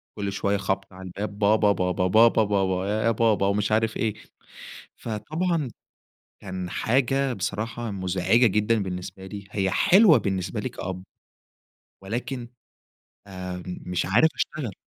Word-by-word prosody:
كل 100 -2 -3
شوية 100 0 0
خَبْط 95 0 -3
على 95 -1 -9
الباب 105 +1 +1
بابا، 105 -1 +4 0.2
بابا، 90 +1 0
بابا، 110 +2 +5
بابا، 95 -2 0 0.2
يا 115 - +3
بابا 110 -3 +2
ومش 105 +2 0
عارف 110 0 +1
إيه. 110 -3 0 0.8
فطبعًا 155 - -2 0.7
كان 95 -2 -5
حاجة 135 +4 +1
بصراحة 115 +3 -3
مُزعجة 95 +5 +2
جدًا 105 +1 +1
بالنسبة 95 +1 -6
لي 100 0 -8
هي 95 -2 0
حلوة 190 - +6
بالنسبة 95 -2 -2
لي - - -3
كأب، 90 0 -6 1.0
ولكن 120 +4 -4 0.8
آآ 90 -2 -6
م 90 - -6
مش 90 -1 0
عارف 115 - +4
أشتغل. 130 -9 -3
100 Hz, 135 wpm, -25 LUFS, 95-115 Hz, 1.0 s, حلوة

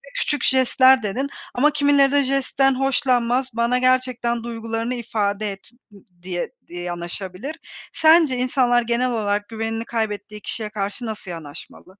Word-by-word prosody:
Küçük 310 - -1
jestler 260 -1 +4
dedin 250 +8 -2 0.3
ama 295 +5 +4
kimileri 285 -2 +3
de 285 0 +3
jestten 270 0 +1
hoşlanmaz; 255 -1 +1
bana 235 +2 +1
gerçekten 255 -2 +1
duygularını 230 +1 -3
ifade 215 -3 -2
et, 195 - -12 0.2
ı - - -15 0.3
diye 180 -1 -4 0.2
di - - -15
yanaşabilir. 180 - -6 0.4
Sence 315 -5 +5
insanlar, 250 -1 +2
genel 240 +2 0
olarak 205 -2 -1
güvenini 225 0 -3
kaybettiği 210 -2 -4
kişiye 215 0 -4
karşı 205 +3 -4
nasıl 215 -4 -6
yanaşmalı? 160 -2 -10
235 Hz, 135 wpm, -22 LUFS, 210-260 Hz, 0.4 s, Sence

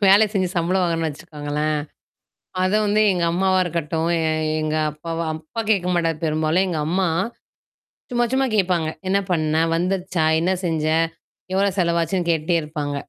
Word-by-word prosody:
வேல 205 +3 +7
செஞ்சு 185 -3 +1
சம்பள 175 +2 +1
வாங்குறோன்னு 165 -2 0
வச்சுக்கோங்களேன். 150 -1 -3 0.9
அத 185 - +1
வந்து 210 +1 +2
எங்க 175 -2 0
அம்மாவா 185 +1 +2
இருக்கட்டும், 165 -1 -2
எ - - 0 0.4
எங்க 155 0 -1
அப்பாவ 165 +2 -6 0.2
அப்பா 160 +8 -6
கேட்க 185 -4 +2
மாட்டாரு, 165 -2 +1
பெரும்பாலும் 155 +4 +1
எங்க 160 -4 -1
அம்மா 185 +1 +1 1.0
சும்மா, 240 0 +2
சும்மா 265 +1 +2
கேப்பாங்க. 180 -6 +2 0.2
"என்ன 195 +1 +3
பண்ண 155 -3 +1 0.2
வந்துருச்சா? 180 -1 -1 0.2
என்ன 180 +3 +1
செஞ்ச? 160 -3 -1 0.7
எவ்ளோ 195 +1 +3
செலவாச்சுன்னு" 170 +1 +1
கேட்டுட்டே 165 +1 +1
இருப்பாங்க. 150 -2 -4
170 Hz, 140 wpm, -22 LUFS, 155-185 Hz, 1.0 s, வேல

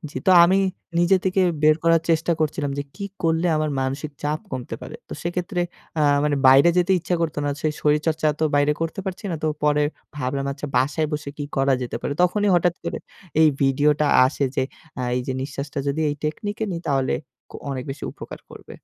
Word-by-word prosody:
যেহেতু 185 - 0
আমি 185 +3 +4 0.4
নিজে 175 +2 +4
থেকে 190 0 +2 0.2
বের 155 0 +6
করার 165 -1 +4
চেষ্টা 165 +1 +2
করছিলাম, 150 -2 -1
যে - - 0
কি 200 - -5 0.2
করলে 165 +1 +2
আমার 155 -1 0
মানসিক 135 +3 -3
চাপ 150 +1 -1
কমতে 125 -2 -4
পারে। - - -8
তো - - -8
সেক্ষেত্রে 175 +2 -2 0.4
আ - - +2 0.2
মানে 150 -1 +1
বাইরে 135 +5 +7
যেতে 180 +2 +3
ইচ্ছা 175 +1 -2
করত 160 -2 -1
না। 145 - 0
সে 155 - +1
শরীরচর্চা 155 +1 +1
তো - - +3
বাইরে 145 +1 +3
করতে 165 +4 -2
পারছি 190 +2 -5
না, 165 - -2
তো - - +1 0.2
পরে 150 0 +3 0.3
ভাবলাম, 135 0 -2
আচ্ছা, 140 +1 -6
বাসায় 150 +4 +1
বসে 150 -1 -3
কি 145 - -3
করা 135 0 +3
যেতে 125 - -4
পারে? - - -2
তখনই 205 +3 +2
হঠাৎ 175 0 +3
করে - - -3 0.4
এই 160 - +7
ভিডিওটা 145 +2 +3 0.2
আসে, 140 +1 -1
যে 130 - +2 0.4
আ - - -2
এই 125 - 0
যে 130 - -1
নিঃশ্বাসটা 140 +1 -5
যদি 140 +3 -1
এই 145 - -1
টেকনিকে 205 +8 -3
নিই, 170 - -4
তাহলে 135 -2 +1 0.6
অনেক 130 -2 -4
বেশি 135 - -6
উপকার - - -10
করবে। - - -12
150 Hz, 200 wpm, -23 LUFS, 140-170 Hz, 0.6 s, বাইরে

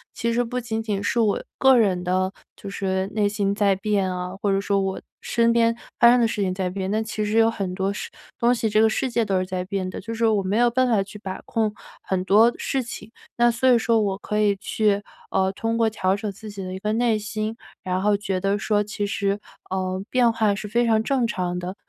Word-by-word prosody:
其 235 0 -1
实 240 +1 +2
不 250 +1 -3
仅 225 -2 -3
仅 205 -3 -2
是 235 - 0
我 215 -3 +1 0.2
个 265 -1 +6
人 190 -6 +2
的， 185 +1 0 0.2
就 - - -9
是 190 -1 -1
内 210 -1 +2
心 200 -1 0
在 200 -2 +2
变 195 -1 0
啊， 180 0 -4
或 205 - +1
者 195 - +2
说 200 0 +1
我 195 0 -2 0.2
身 230 0 +2
边 230 0 +3 0.2
发 235 - +8
生 250 - +4
的 - - +4
事 215 -2 -3
情 185 -2 0
在 185 -1 -2
变， 190 +1 -4
那 215 +2 0
其 215 -1 -3
实 210 - -2
有 225 0 +5
很 195 -5 -3
多 190 +1 0
事 205 - -6 0.3
东 240 +1 +3
西， 225 -2 -1
这 215 +1 +3
个 220 - +5
世 260 +4 -1
界 235 -1 +1
都 195 -2 +1
是 185 - 0
在 185 0 -4
变 190 -1 -3
的， - - -6
就 230 +3 -6
是 230 0 0
我 215 -2 +2
没 190 +2 -1
有 240 0 +4
办 255 +2 +2
法 215 -4 +3
去 205 +2 -11
把 190 -2 -6
控 220 -2 0 0.3
很 185 -1 -2
多 220 +5 +5
事 270 - -1
情。 225 -1 -9 0.3
那 240 0 +4
所 235 +3 +2
以 245 - +6
说 230 0 +2
我 195 -2 -1
可 210 +1 -3
以 205 -1 +3
去， 205 0 0 0.3
呃， 190 0 +2
通 225 +3 -2
过 225 -1 +3
调 190 -3 0
整 205 0 -4
自 215 +2 -10
己 200 -1 -7
的 185 0 -5
一 190 - -5
个 210 +2 -1
内 230 -1 +2
心， 215 +1 -4 0.3
然 185 0 -1
后 205 +1 +3
觉 195 -2 -2
得 195 +2 0
说 210 0 +1
其 205 0 -3
实， 200 0 -1 0.3
呃， 185 0 -2
变 245 -2 +3
化 220 -3 +1
是 200 - -6
非 235 +3 +1
常 220 -1 +3
正 255 -1 +1
常 180 -5 -2
的。 180 +2 -5
210 Hz, 270 characters per minute, -23 LUFS, 195-230 Hz, 0.3 s, 发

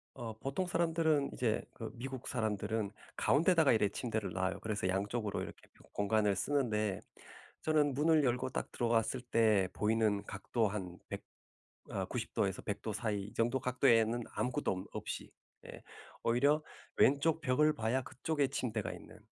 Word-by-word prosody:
어 115 -4 -5
보통 140 +9 -2
사람들은 160 -4 +2
이제 115 -3 0
그 115 - -6
미국 130 +1 -6
사람들은 110 -2 -1 0.3
가운데다가 160 0 +4
이렇게 105 -2 +3
침대를 110 -6 -2
놔요. 95 0 -1
그래서 105 -4 -2
양쪽으로 100 +2 -1
이렇게 - - -6 0.4
공간을 100 0 +2
쓰는데 110 -6 0 0.6
저는 150 -3 +2
문을 155 +1 +4
열고 125 +1 +1
딱 - - -4
들어왔을 115 +1 +1
때 110 -6 +3
보이는 105 -1 +1
각도 115 0 -1
한 95 -3 -5
100 - - -5 0.7
아 - - -2
90 - - -4
도에서 95 -1 0
100 105 - -3
도 110 - -3
사이 105 -3 -1
이 105 - -11
정도 120 +3 +1
각도에는 120 -2 +3
아무것도 125 0 0
엄 95 0 -4
없이 - - -5 0.4
예. - - -10 0.4
오히려 140 +6 +3 0.3
왼쪽 145 +4 +4
벽을 150 +3 +3
봐야 115 +4 0
그쪽에 145 +3 -1
침대가 125 -5 -2
있는 - - -11
115 Hz, 315 characters per minute, -34 LUFS, 105-135 Hz, 0.7 s, 가운데다가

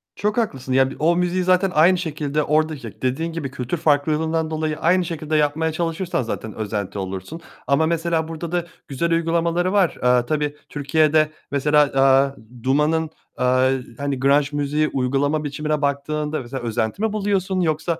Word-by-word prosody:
Çok 210 +2 -1
haklısın. 135 - -1
Ya 130 0 +4
bi - - -8
o 165 +3 +3
müziği 180 +1 0
zaten 185 +1 +3
aynı 170 +4 +5
şekilde, 150 -2 -2
oradaki, 150 -6 -1
dediğin 150 +6 -1
gibi 150 -5 -4
kültür 135 +4 -3
farklılığından 160 +1 +1
dolayı 155 -1 -2
aynı 180 +3 +3
şekilde 155 -2 -3
yapmaya 155 +2 +1
çalışırsan 165 0 -2
zaten 110 -1 -5
özenti 105 -2 -4
olursun. 95 - -6 0.3
Ama 140 +3 +3
mesela 165 0 0
burada 165 +1 -6
da 175 -1 -1 0.2
güzel 170 +4 -2
uygulamaları 170 +2 +1
var. 195 -4 +4
Eee, 125 -1 +4
tabii 150 +1 -1
Türkiye'de 155 +1 +2 0.2
mesela, 150 +1 +3
aaa, 135 0 +4 0.3
Duman'ın, 150 +4 +1 0.3
aaa, 130 +1 +3 0.3
hani 140 -1 -2
grunge 140 +2 +3
müziği 145 +1 0
uygulama 140 +3 0
biçimine 150 +1 -2
baktığında 150 +2 -1
mesela 125 0 -6
özenti 110 - -2
mi 220 -1 0
buluyorsun? 195 -2 0
Yoksa 160 0 -1
155 Hz, 155 wpm, -21 LUFS, 140-165 Hz, 0.3 s, aynı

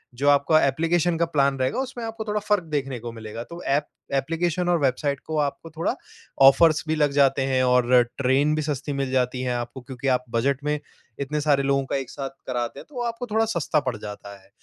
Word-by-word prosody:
जो 140 +4 +2
आपका 145 +2 +4
एप्लिकेशन 165 +4 +1
का 170 - +2
प्लान 140 -4 +1
रहेगा, 130 - 0
उसमें 260 -2 -4
आपको 225 0 -5
थोड़ा 210 0 -1
फ़र्क़ 210 -2 +1
देखने 135 -5 -3
को 120 +1 -6
मिलेगा। 115 0 -7
तो 170 +6 -10
ऐप 145 +2 +1 0.3
एप्लिकेशन 170 +5 0
और 175 -1 +3
वेबसाइट 140 +1 0
को 160 -1 -3
आपको 145 +3 -2
थोड़ा 160 +1 -2 0.5
ऑफ़र्स 150 +4 +6
भी 160 - +1
लग 150 -2 +2
जाते 140 -1 +3
हैं, 130 -1 +1
और 125 0 +4 0.2
ट्रेन 140 +3 +2
भी 155 - 0
सस्ती 145 -1 -3
मिल 135 -1 -2
जाती 125 -1 0
है 125 -1 -1
आपको, 120 +2 -5
क्योंकि 125 +1 -6
आप 125 -1 +2
बजट 135 +4 0
में 150 0 0 0.4
इतने 150 +2 -2
सारे 145 -2 +2
लोगों 135 0 +1
का - - -3
एक 135 -3 -5
साथ 135 -2 -5 0.2
कराते 120 -2 -3
हैं, - - -11
तो 255 -5 -6
आपको 235 +1 -3
थोड़ा 220 +1 +3
सस्ता 170 -7 0
पड़ 125 - 0
जाता 105 -1 -8
है। 95 - -24
140 Hz, 215 wpm, -24 LUFS, 130-160 Hz, 0.5 s, ऑफ़र्स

